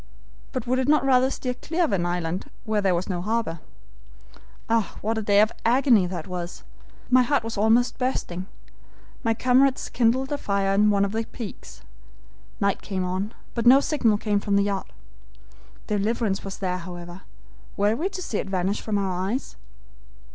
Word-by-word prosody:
But 255 -3 -3
would 255 +1 +1
it 260 - 0
not 300 -1 +4
rather 260 -1 +4
steer 255 -2 -3
clear 330 +7 -2
of 320 - +1
an 175 -3 +1
island 175 0 -3
where 215 -2 0
there 190 -3 +2
was 170 - -2
no 180 -3 -2
harbor. 220 -4 -1 1.1
"Ah, 225 -2 0
what 220 +2 -1
a - - -2
day 205 -1 +4
of 215 - +3
agony 240 -5 +4
that 175 -3 -5
was! 180 -1 -6 0.5
My 255 0 +7
heart 280 +1 +1
was 225 0 -4
almost 225 +5 +2
bursting. 190 -8 -2 0.8
My 225 -2 +1
comrades 255 +3 +3
kindled 255 +3 +1
a 290 - -1
fire 200 -1 0
on 210 +2 +4
one 200 -1 +3
of 195 - -3
the 225 +1 -2
peaks. 225 -3 -9 0.8
Night 200 -1 +1
came 190 -2 -3
on, 190 +5 -3 0.2
but 235 0 0
no 260 +3 +9
signal 250 -8 +2
came 205 -1 0
from 200 0 0
the 200 - +4
yacht. 200 -1 -2 1.0
Deliverance 210 -1 0
was 195 -1 -6
there, 185 -2 -2
however. 175 +1 -8 0.6
Were 205 +2 +2
we 340 +10 -1
to 370 -2 -6
see 215 - -2
it - - -4
vanish 190 +1 -1
from 215 -2 -1
our 190 -2 -1
eyes? 255 +5 -3
210 Hz, 180 wpm, -25 LUFS, 190-245 Hz, 1.1 s, no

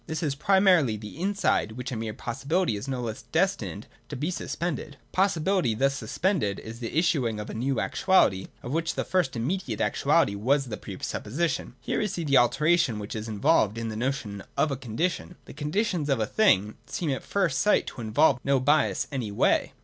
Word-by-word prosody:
This 160 +1 -3
is 145 -3 0
primarily 180 - +3
the 105 +7 -9
inside, 195 - +1
which 125 +2 -6
as - - -3
a - - -4
mere 110 -1 -4
possibility 140 - -1
is 105 +6 -6
no 130 -2 -2
less 110 -2 -4
destined - - -1 0.2
to - - -5
be 150 +7 -2
suspended. 155 -5 -4
Possibility 185 - +1
thus 135 +4 +2
suspended 135 - -1
is 115 +1 -9
the 120 +4 -4
issuing 130 -10 +1
of 105 - -6
a - - -7
new 130 +4 -1
actuality, 100 - +2 0.2
of 120 - -5
which 165 +2 -1
the - - -1
first 180 -9 0
immediate 125 - -2
actuality 100 - +2
was 135 +8 +1
the 110 -4 -5
pre - - -8
supposition. 160 +10 -2
Here - - -1
we 210 - +1
see 180 -4 -4
the 140 -3 +4
alternation 150 0 +2
which 105 +1 -6
is 110 0 -4
involved 110 0 +2
in 115 -1 -3
the 110 - -5
notion 110 -5 -3
of 155 - +2
a - - 0
Condition. 145 +9 -3
The - - -11
Conditions 155 +2 -1
of 135 -4 +2
a 110 - +1
thing 105 - +2
seem 165 -5 -2
at 130 - -2
first 185 -8 0
sight 210 - +3
to - - -7
involve 120 +4 +3
no 140 -1 +2
bias 145 +3 +2
any 125 -7 -3
way. 100 - +2
135 Hz, 200 wpm, -27 LUFS, 110-170 Hz, 0.2 s, the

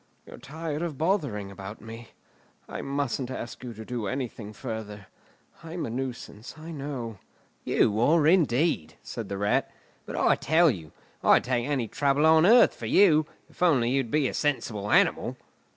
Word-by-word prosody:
You're - - -12
tired 155 +2 -5
of 165 -5 -4
bothering 145 - -1
about 100 +2 -9
me. 115 +1 -10 0.6
I - - -6
mustn't 140 -2 -2
ask 120 -2 -7
you 125 - -6
to 110 +1 -9
do 120 -3 -4
anything 120 -4 -5
further. 105 -3 -7 0.6
I'm 165 +1 -5
a 115 - -5
nuisance, 125 -2 -6
I 160 +2 -9
know." 135 -8 -6 0.4
"You 105 0 +2
are, 150 +6 +4
indeed," 150 - +2
said - - -6
the 100 - -3
Rat. 100 +1 +1 0.4
"But - - -6
I - - +3
tell 160 +1 +4
you, 80 -8 -8 0.3
I'd - - +5
take 125 -1 -1
any 135 -6 -1
trouble 140 +6 +1
on 160 +2 +6
earth 240 +3 +6
for - - -7
you, 155 -6 +5 0.2
if - - -22
only 135 -9 +3
you'd 135 -3 0
be 150 +1 +2
a - - -4
sensible 115 -8 -2
animal." - - +2
130 Hz, 170 wpm, -27 LUFS, 110-155 Hz, 0.6 s, on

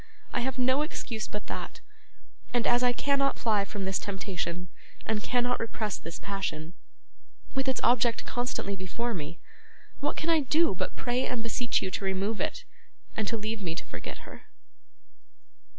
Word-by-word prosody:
I - - +2
have 260 +2 -1
no 260 +3 +4
excuse 230 -7 -2
but 210 - -4
that; - - -5 0.8
and 240 - +3
as 240 0 +5
I 250 -1 +5
cannot 275 +2 +2
fly 210 -3 +3
from 200 -1 -3
this 190 0 +1
temptation, 180 -3 -3 0.4
and 220 -1 +1
cannot 245 +2 +2
repress 220 -3 -2
this 165 +1 -6
passion, 180 -5 -3 0.8
with 270 0 +1
its 265 - +2
object 240 -1 +4
constantly 245 -5 -1
before 230 +6 -2
me, 165 -2 -4 0.6
what 290 +1 0
can 330 +1 +2
I 325 - +6
do 300 0 +4
but 185 - -2
pray 245 +1 +1
and 245 -3 -1
beseech 235 +1 +2
you 190 - -1
to - - -2
remove 195 +3 +1
it, - - -1 0.5
and 215 -2 0
to 230 - +1
leave 215 0 -2
me 170 -4 -1
to - - -4
forget - - -7
her? - - -11
225 Hz, 165 wpm, -30 LUFS, 195-250 Hz, 0.8 s, I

